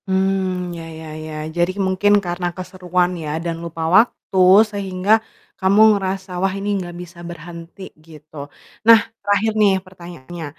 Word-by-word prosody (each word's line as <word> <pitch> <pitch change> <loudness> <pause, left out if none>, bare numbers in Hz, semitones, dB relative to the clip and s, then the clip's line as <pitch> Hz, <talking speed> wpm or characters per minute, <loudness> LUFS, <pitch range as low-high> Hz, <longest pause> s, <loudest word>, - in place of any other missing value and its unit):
Mmm, 190 -2 0
ya 165 - -7 0.2
ya 160 - -9 0.2
ya. 155 - -8 0.2
Jadi 175 +1 +2
mungkin 190 +2 +2
karena 175 0 -2
keseruan 180 -1 -1
ya 150 - -5 0.2
dan 170 -1 -2
lupa 165 -1 -5
waktu 220 -3 +1 0.3
sehingga 195 -1 -2 0.5
kamu 195 +3 +4
ngerasa, 190 -1 -3
"Wah 195 0 +1
ini 200 +1 -3
nggak 175 -1 -8
bisa 170 0 -12
berhenti." 170 +2 -10 0.2
Gitu. 155 -1 -16 0.5
Nah, 230 0 +10 0.2
terakhir 205 +2 +1
nih 200 -2 +5
pertanyaannya. 175 -3 -10
185 Hz, 140 wpm, -20 LUFS, 170-195 Hz, 0.5 s, Nah